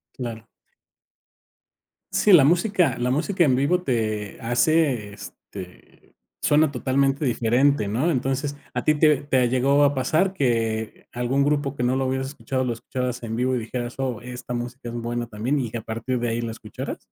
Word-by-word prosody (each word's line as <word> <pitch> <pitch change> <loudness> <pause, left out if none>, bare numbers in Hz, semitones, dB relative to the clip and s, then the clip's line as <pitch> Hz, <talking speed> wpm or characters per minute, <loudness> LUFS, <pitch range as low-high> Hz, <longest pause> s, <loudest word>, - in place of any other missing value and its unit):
Claro. 115 -3 -6 1.6
Sí, 210 - +3
la 155 -7 +8
música 175 - +2
la 125 +1 0
música 170 +6 +1
en 130 -4 +3
vivo 150 +7 +2
te 110 - -2
hace, 120 -2 +1
este, 95 -2 -12 0.3
suena 150 0 +3
totalmente 135 +2 +1
diferente, 120 0 +2
¿no? 125 +11 +1
Entonces, 135 +1 -1 0.2
¿a 125 - -2
ti 155 - +4
te 150 -1 +4
te 130 -4 +2
llegó 135 +3 +3
a 145 0 +4
pasar 160 +9 +1
que 115 - -1
algún 125 +3 0
grupo 145 -1 0
que 125 - -2
no 125 +2 +2
lo 135 - 0
hubieras 130 0 -1
escuchado 135 -2 -3
lo 125 - -1
escucharas 125 +1 -4
en 115 0 -3
vivo 130 +1 +1
y - - 0
dijeras: 120 +1 -5
"Oh, 125 -4 -2
esta 125 0 -7
música 120 +1 -5
es 115 - -7
buena 120 0 -3
también", 120 +7 -1
y 120 -4 -2
que 115 - -4
a - - -8
partir 115 +4 -3
de 120 - -1
ahí 115 +1 -1
la 115 -1 -3
escucharas? 115 - -7
125 Hz, 180 wpm, -24 LUFS, 120-140 Hz, 1.6 s, la